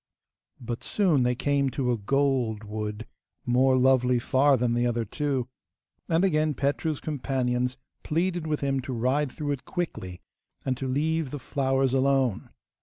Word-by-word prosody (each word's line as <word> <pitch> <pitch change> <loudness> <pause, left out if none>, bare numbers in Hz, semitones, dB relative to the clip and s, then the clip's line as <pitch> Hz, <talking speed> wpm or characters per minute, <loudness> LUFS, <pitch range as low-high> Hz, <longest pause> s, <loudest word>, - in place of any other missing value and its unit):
But 120 -1 -5
soon 180 -10 +2
they 125 0 +2
came 140 +1 +1
to 130 -1 -1
a 120 - +1
gold 125 -2 0
wood 105 +1 -5 0.4
more 130 +2 +3
lovely 125 -1 +4
far 135 +3 +3
than 120 -1 +1
the 120 +1 +1
other 120 -1 -1
two, 135 +1 -2 0.6
and 165 +3 +3
again 155 -4 +1
Petru's 145 +3 -1
companions 125 -3 -1 0.2
pleaded 170 +1 -1
with 150 -1 -1
him 135 -1 0
to 130 +1 -5
ride 130 +4 0
through 145 -1 -3
it 140 -3 -3
quickly, 95 - -4 0.5
and 130 - 0
to 135 - -3
leave 155 +3 0
the 145 - -5
flowers 135 -1 0
alone. 135 -4 +1
135 Hz, 155 wpm, -27 LUFS, 125-145 Hz, 0.6 s, lovely